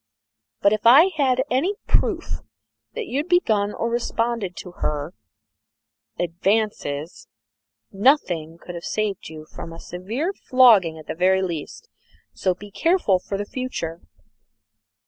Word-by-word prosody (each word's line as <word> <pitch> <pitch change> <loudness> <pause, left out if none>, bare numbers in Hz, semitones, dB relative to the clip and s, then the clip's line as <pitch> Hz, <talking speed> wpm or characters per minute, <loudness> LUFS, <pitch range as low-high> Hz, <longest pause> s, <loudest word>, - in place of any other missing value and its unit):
But 200 - +5
if 215 +1 +1
I 305 +10 +8
had 265 -4 +2
had 260 - +2
any 320 +11 +1
proof - - 0 0.6
that 465 -2 -3
you 265 - -3
had 300 +5 -2
begun 215 - +2
or 230 - -2
responded 230 -4 -1
to 180 - -8
her 150 +2 -2 1.0
hem - - 0
advances, 175 -4 -2 0.6
nothing 185 - +2
could 175 - -9
have 170 -1 -7
saved 210 -6 -2
you 155 -1 -10
from 165 - -9
a 165 - -10
severe 225 - -3
flogging 225 - +5
at 155 - -11
the - - -4
very 190 +3 +2
least 170 - -5 0.5
so 185 -2 0
be 205 +2 -12
careful 330 - +2
for 195 +2 -4
the 205 - -3
future." 195 -9 -5
205 Hz, 145 wpm, -23 LUFS, 175-255 Hz, 1.0 s, I